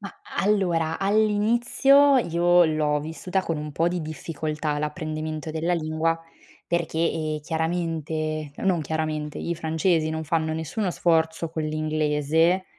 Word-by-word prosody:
Mah, 200 - -10 0.2
allora 175 -6 +1
all'inizio 230 +7 +4
io 175 -3 +4
l'ho 150 -2 +1
vissuta 180 +5 -3
con 165 -3 -2
un 150 0 -5
po' 165 +4 +1
di 180 0 -2
difficoltà 155 -1 -3
l'apprendimento 155 0 -4
della 165 +3 0
lingua 160 0 0 0.5
perché, 170 -2 -1
ehm, 155 -2 0
chiaramente 160 -2 -2
non 185 -4 +1
chiaramente, 155 -1 -3
i 170 - -2
francesi 160 0 +1
non 160 0 -3
fanno 160 0 0
nessuno 175 +5 -2
sforzo 160 -1 +1
con 160 -1 -3
l'inglese 155 +3 +1
160 Hz, 125 wpm, -25 LUFS, 155-175 Hz, 0.5 s, all'inizio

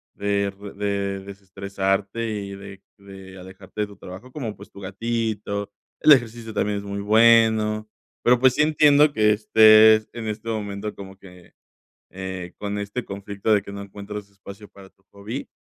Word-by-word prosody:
de 100 0 -1 0.3
de 100 -1 -2
desestresarte 100 +2 -3
y 100 -2 -5
de 100 -1 -11 0.2
de 95 -1 -13
alejarte 95 +2 -9
de 105 - -1
tu 100 -1 -15
trabajo, 95 +8 -11
como, 120 -7 -5
pues, - - -14
tu - - -13
gatito, 105 0 -3 0.3
el 155 - +5
ejercicio 115 -3 -1
también 105 0 -1
es 100 - -6
muy 100 0 -5
bueno, 110 0 +4 0.4
pero, 125 0 +4
pues, 130 0 +5
sí 150 - +2
entiendo 150 -1 +5
que 105 -2 +3
estés 110 0 +6
en 115 -2 -6
este 105 +2 -6
momento 105 -1 -4
como 95 -1 -11
que, 90 -2 -17 0.6
eh, 95 -1 -7
con 105 0 -4
este 100 +5 -4
conflicto 100 +2 -2
de 105 - +3
que 100 - -10
no 100 - -7
encuentras 100 +1 -8
espacio 100 +1 -13
para 100 -1 -15
tu 95 - -38
hobby, 105 +7 -7
100 Hz, 165 wpm, -23 LUFS, 100-110 Hz, 0.6 s, estés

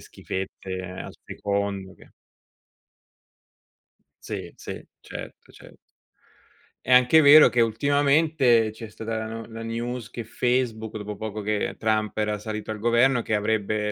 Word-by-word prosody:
schifezze 95 0 -6
al 90 +1 -7
secondo 100 -2 -3
che - - -19 2.1
Sì, - - -6
sì, - - -8 0.2
certo, - - -10
certo. - - -16 1.1
È 130 - +4
anche 125 +6 +7
vero 150 +2 +9
che 120 - +2
ultimamente 140 0 +3
c'è 110 0 -9
stata 110 +1 -5
la 110 - -3
no 115 0 -6
la 115 0 -8
news 120 +1 -4
che 120 - -5
Facebook 115 -2 -1
dopo 105 0 -6
poco 110 -1 -5
che 105 0 -1
Trump 110 -1 0
era 105 -1 -1
salito 105 +1 -6
al 110 - -3
governo 120 +3 +3
che - - -3
avrebbe 105 0 0
110 Hz, 135 wpm, -25 LUFS, 105-120 Hz, 2.1 s, vero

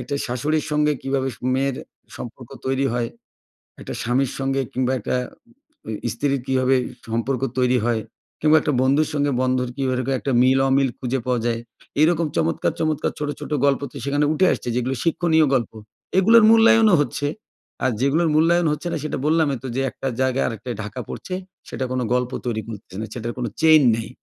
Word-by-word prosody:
একটা - - -4
শাশুড়ির 145 +6 -1
সঙ্গে 150 0 +2
কীভাবে 135 0 -1 0.3
মেয়ের 135 0 0 0.4
সম্পর্ক - - -9 0.2
তৈরি 135 +1 +1
হয়, 120 -1 -1 0.7
একটা - - -6
স্বামীর 125 +3 0
সঙ্গে 135 0 0
কিংবা 130 0 0
একটা 110 - -2 0.7
ঐ - - -5 0.2
স্ত্রীর 140 +2 -1
কীভাবে 130 0 +2 0.3
সম্পর্ক 115 +3 -1 0.2
তৈরি 125 0 +3
হয় 115 -2 +1 0.4
কিংবা 155 +1 +5
একটা 150 - 0
বন্ধুর 140 +4 +3
সঙ্গে 145 -1 +1
বন্ধুর 130 -1 0
কীভাবে 130 -1 -1
একটা 140 - -2
মিল-অমিল 135 +1 +3
খুঁজে 130 +1 -1
পাওয়া 125 -1 +1
যায়, 115 -1 0 0.4
এইরকম 165 +1 +3
চমৎকার, 165 0 +1
চমৎকার 155 -2 0
ছোটো, 145 -1 -2
ছোটো 150 - -3
গল্প 140 0 +2
তো - - -19
সেখানে 145 +1 +1
উঠে 170 +5 +3
আসছে, - - -7
যেগুলো 125 +2 -1
শিক্ষণীয় 165 -1 +3
গল্প। 120 -5 +1 0.5
এগুলোর 225 +4 +6
মূল্যায়নও 225 -2 +6
হচ্ছে। 145 0 -3 0.6
আর 130 - +3
যেগুলোর 155 +5 +2
মূল্যায়ন 165 +2 +3
হচ্ছে 150 +3 -3
না, - - -1
সেটা 155 - -3
বললামই 155 -3 +2
তো - - -4
যে, 135 - 0
একটা 135 - -5
জায়গায় 130 0 +1
আরেকটায় 115 +1 -5
ঢাকা 105 +4 -7
পড়ছে, 185 - -6 0.4
সেটা 130 - -3
কোনো 130 -1 -1
গল্প 125 0 0
তৈরি 115 -3 -1
করছে 105 -4 -9
না, 110 - -3
সেটার 120 0 -4
কোনো 120 -2 -2
চেইন 160 -1 +7
নেই। 110 -1 -5
135 Hz, 175 wpm, -22 LUFS, 125-150 Hz, 0.7 s, চেইন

